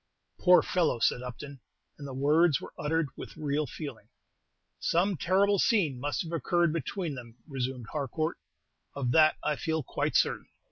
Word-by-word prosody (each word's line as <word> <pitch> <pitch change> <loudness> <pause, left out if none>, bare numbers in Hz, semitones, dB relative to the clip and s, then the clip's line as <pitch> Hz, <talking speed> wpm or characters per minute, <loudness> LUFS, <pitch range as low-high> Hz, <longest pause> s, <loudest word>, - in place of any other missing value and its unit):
"Poor 180 -1 +6
fellow!" 170 -8 +1
said 120 +1 +1
Upton; 130 +3 -8 0.4
and 140 - -7
the 135 - -7
words 150 +2 +3
were - - -10
uttered 160 0 0
with - - -9
real 150 0 -1
feeling. 125 -6 -8 0.7
"Some 185 +4 +1
terrible 195 +5 +2
scene 175 - +2
must 145 +6 -1
have 165 - -8
occurred 170 +1 +1
between 165 +1 -3
them," 120 -3 -9
resumed 130 -3 -4
Harcourt; 155 +3 -2 0.6
"of 130 -4 -1
that 155 +3 +5
I 150 - +1
feel 160 -1 -1
quite - - -2
certain." - - +2
150 Hz, 155 wpm, -29 LUFS, 135-170 Hz, 0.7 s, Poor